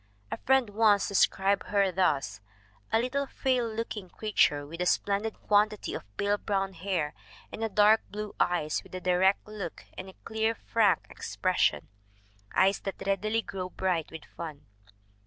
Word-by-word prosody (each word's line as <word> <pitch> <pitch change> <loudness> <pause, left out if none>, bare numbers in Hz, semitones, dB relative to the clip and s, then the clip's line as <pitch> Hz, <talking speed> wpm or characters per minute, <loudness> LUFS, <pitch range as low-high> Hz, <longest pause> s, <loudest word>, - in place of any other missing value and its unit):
A - - -2
friend 265 -5 +4
once 210 -1 +4
described 195 0 +2
her 200 -2 +2
thus: 140 - 0 0.5
"A - - +4
little, 270 +4 -1
frail 255 -3 0
looking 220 -4 -5
creature, 150 -10 +1
with 165 +4 -7
a 180 - +1
splendid 205 +4 0
quantity 210 0 +2
of 100 +1 -9
pale 205 0 +1
brown 195 -1 -1
hair, 170 -5 -2 0.4
and - - -7
dark 215 +1 +6
blue 210 0 -6
eyes 155 -4 +1
with - - -12
a - - -3
direct 185 +3 +2
look 205 -6 -7
and 185 +1 -7
a - - -13
clear, 220 +1 0
frank 215 -5 +2
expression - - 0 0.7
eyes 195 +1 +4
that 195 - -5
readily 215 +3 0
grow 185 -2 -5
bright 180 -3 -1
with 160 -1 -9
fun." 155 -4 -8
200 Hz, 155 wpm, -29 LUFS, 180-215 Hz, 0.7 s, dark